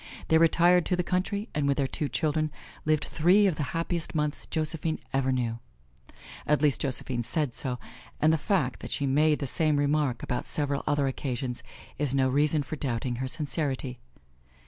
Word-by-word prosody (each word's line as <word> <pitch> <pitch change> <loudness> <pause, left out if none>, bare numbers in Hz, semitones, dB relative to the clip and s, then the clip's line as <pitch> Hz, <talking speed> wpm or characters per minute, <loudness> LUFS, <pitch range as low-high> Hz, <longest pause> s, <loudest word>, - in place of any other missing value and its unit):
They 160 - +5
retired 175 +2 +5
to 180 - +2
the 180 - 0
country 195 +4 -1
and 145 -1 0
with 140 - +2
their 140 - +2
two 145 +2 -2
children 155 0 0 0.3
lived 155 -1 +2
three 180 +6 +4
of 185 -6 +1
the - - -2 0.2
happiest 170 0 -3
months 150 -1 -1
Josephine 160 0 -1 0.2
ever 135 -1 +1
knew; 120 -3 -1 0.9
at 150 0 +3
least 145 -3 +2
Josephine 130 -2 -1
said 145 +1 -1
so, 125 0 -2 0.4
and 155 +1 +4
the - - +3
fact 150 -9 0
that - - -8
she 140 - -1
made 150 +3 +3
the 140 - -3
same 155 +2 +1
remark 145 -4 +1
about 125 - -2
several 145 -2 0
other 145 -1 +2
occasions 130 -2 -3 0.4
is 140 -2 0
no 130 -1 +3
reason 145 +2 +3
for 155 - -6
doubting 120 -2 -2
her 130 +1 -2
sincerity. 135 -3 -2
145 Hz, 180 wpm, -28 LUFS, 130-160 Hz, 0.9 s, They